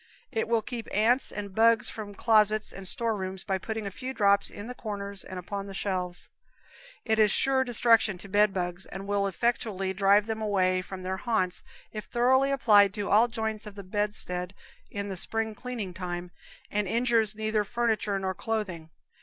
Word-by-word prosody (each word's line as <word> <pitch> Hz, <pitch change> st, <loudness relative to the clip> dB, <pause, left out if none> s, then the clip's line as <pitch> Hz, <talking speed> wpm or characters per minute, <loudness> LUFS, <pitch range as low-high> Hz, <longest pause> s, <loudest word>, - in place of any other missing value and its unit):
It 220 Hz, -, -1 dB
will 230 Hz, -1 st, +1 dB
keep 235 Hz, -1 st, -6 dB
ants 235 Hz, +6 st, +2 dB
and 200 Hz, -1 st, -6 dB
bugs 225 Hz, +1 st, +4 dB
from 205 Hz, -2 st, -5 dB
closets 215 Hz, -1 st, +3 dB
and 195 Hz, -1 st, -7 dB
store 230 Hz, +3 st, +1 dB
rooms 190 Hz, -1 st, -5 dB
by 190 Hz, -1 st, -1 dB
putting 220 Hz, +1 st, -4 dB
a 200 Hz, -, -4 dB
few 255 Hz, +6 st, -6 dB
drops 200 Hz, -1 st, +3 dB
in 205 Hz, -, -9 dB
the 250 Hz, -, -6 dB
corners 200 Hz, -4 st, -5 dB
and 185 Hz, -, -8 dB
upon 195 Hz, +2 st, -5 dB
the 195 Hz, -, -8 dB
shelves; 180 Hz, -3 st, -3 dB, 0.8 s
it 220 Hz, -1 st, +1 dB
is 215 Hz, -1 st, +6 dB
sure 265 Hz, +5 st, +3 dB
destruction 230 Hz, -4 st, +3 dB
to 200 Hz, -, -10 dB
bedbugs, 190 Hz, -3 st, +1 dB
and 190 Hz, +1 st, -7 dB
will 200 Hz, 0 st, 0 dB
effectually 195 Hz, -2 st, -1 dB
drive 200 Hz, +2 st, +4 dB
them 220 Hz, 0 st, -4 dB
away 185 Hz, -3 st, +1 dB
from 185 Hz, 0 st, -8 dB
their 190 Hz, +1 st, -2 dB
haunts 190 Hz, -6 st, -1 dB, 0.3 s
if 215 Hz, -2 st, -6 dB
thoroughly 260 Hz, +3 st, +3 dB
applied 210 Hz, -7 st, +4 dB
to 205 Hz, -2 st, -3 dB
all 220 Hz, +4 st, +6 dB
the 235 Hz, -, -18 dB
joints 220 Hz, -1 st, -3 dB
of 205 Hz, -, -10 dB
the 200 Hz, -, -8 dB
bedstead 190 Hz, -2 st, 0 dB, 0.3 s
in 200 Hz, 0 st, -4 dB
the 190 Hz, -, -4 dB
spring 220 Hz, +4 st, 0 dB
cleaning 220 Hz, -5 st, -6 dB
time, 175 Hz, -1 st, -5 dB, 0.4 s
and 205 Hz, -1 st, 0 dB
injures 230 Hz, -1 st, +2 dB
neither 215 Hz, 0 st, 0 dB
furniture 220 Hz, -2 st, 0 dB
nor 190 Hz, -1 st, -2 dB
clothing. 185 Hz, -6 st, -4 dB
205 Hz, 185 wpm, -28 LUFS, 190-225 Hz, 0.8 s, is